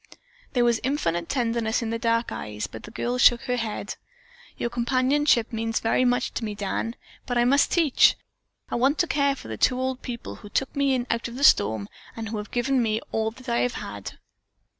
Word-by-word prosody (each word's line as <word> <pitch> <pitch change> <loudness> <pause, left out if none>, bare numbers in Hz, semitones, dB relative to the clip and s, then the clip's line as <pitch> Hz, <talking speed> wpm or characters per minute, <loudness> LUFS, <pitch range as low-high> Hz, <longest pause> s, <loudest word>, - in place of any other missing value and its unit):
There 245 -2 +3
was 235 -1 +3
infinite 175 - -1
tenderness 235 -2 0
in 225 - -3
the 230 - -2
dark 230 0 +1
eyes, 105 0 -4
but - - -9
the - - -10
girl 245 +3 -2
shook 240 -1 +6
her 250 -1 -1
head. 225 -3 -4 0.6
"Your 235 - -2
companionship 255 0 +2
means 225 0 -1
very 230 +3 +2
much 245 0 +1
to - - -3
me, 210 -2 -3
Dan, 210 +3 -3 0.3
but 245 - -1
I 240 - +4
must 280 +3 +4
teach. 320 -6 +5 0.6
I - - -3
want 270 +5 +2
to - - +3
care 280 -3 +1
for - - -11
the 110 -1 -5
two 250 - +2
old 260 0 -2
people 235 -2 -6
who 205 - -12
took 270 +7 -1
me 280 -1 +2
in 245 -1 -1
out 230 0 -1
of 235 - -9
the 275 - -4
storm 110 - +4 0.3
and 225 -1 -5
who 220 - -3
have 210 0 -6
given 250 +2 +1
me 220 -1 +1
all 220 0 0
that 255 +3 -15
I 235 0 +1
have 245 - 0
had." 100 -1 -6
235 Hz, 215 wpm, -25 LUFS, 225-255 Hz, 0.6 s, shook